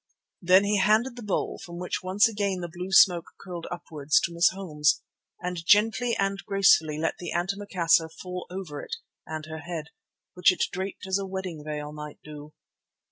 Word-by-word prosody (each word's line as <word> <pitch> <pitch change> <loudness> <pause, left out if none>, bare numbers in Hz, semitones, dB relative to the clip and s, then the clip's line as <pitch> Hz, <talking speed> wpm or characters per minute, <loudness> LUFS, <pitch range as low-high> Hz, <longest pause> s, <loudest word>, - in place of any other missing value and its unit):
Then 185 +2 +6
he 205 0 +2
handed 220 +6 +3
the 245 - -8
bowl, 210 -3 -2
from 170 0 -9
which 180 0 -3
once 190 +4 +3
again 200 -4 -2
the 175 - -3
blue 180 +2 -6
smoke 180 -3 +5
curled 175 -3 -7
upwards, 155 -4 0
to 170 - -2
Miss 170 +1 +5
Holmes, 155 -6 0 0.4
and 180 -2 -4
gently 225 +5 +3
and 195 0 -1
gracefully 175 -6 +4
let 160 +1 -2
the 175 - -5
antimacassar 175 -3 +1
fall 180 +2 -7
over 180 -6 -6
it - - -5 0.3
and 155 -1 -5
her 160 0 -7
head, 160 -2 -6 0.4
which 180 0 +5
it 185 - -1
draped 190 +1 -5
as 190 +1 0
a 195 - -4
wedding 185 -5 -5
veil 150 -1 -5
might 150 -1 -8
do. 150 0 -10
180 Hz, 180 wpm, -27 LUFS, 160-195 Hz, 0.4 s, Then